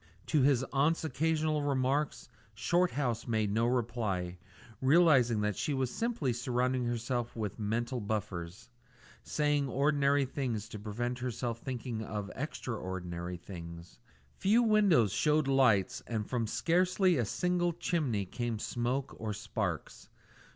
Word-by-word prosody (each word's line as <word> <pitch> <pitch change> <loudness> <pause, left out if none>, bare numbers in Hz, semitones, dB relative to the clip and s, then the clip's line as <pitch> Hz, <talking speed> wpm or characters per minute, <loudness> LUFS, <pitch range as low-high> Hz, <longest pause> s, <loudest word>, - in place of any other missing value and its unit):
To 155 -3 +2
his 135 -1 +4
aunt's 150 +5 +2
occasional 155 +1 0
remarks 135 -2 0 0.3
Shorthouse 135 -3 0
made 110 -3 +1
no 115 +3 +2
reply, 110 -8 -1 0.4
realising 130 -6 +5
that 105 -1 0
she 145 - -1
was 130 -2 -1
simply 225 - -1
surrounding 125 +1 0
herself 120 0 -2
with 110 -2 -4
mental 120 +4 -1
buffers 100 +1 -4 0.5
saying 145 -2 0
ordinary 140 +1 +2
things 125 -6 -3
to 105 - -7
prevent 120 +4 -3
herself 120 -1 -3
thinking 120 -3 -4
of 105 -2 -4
extra 130 -4 -4
ordinary 90 -2 -5
things. 85 0 -10 0.4
Few 220 +5 +4
windows 200 - +4
showed 150 +3 +2
lights, 125 -8 +3
and 110 -3 -2
from 120 -3 -1
scarcely 180 - +2
a 120 - +2
single 175 - 0
chimney 150 - -1
came 120 +3 -3
smoke 125 +5 -2
or 110 -1 -3
sparks. 105 -5 -4
125 Hz, 130 wpm, -32 LUFS, 110-145 Hz, 0.5 s, realising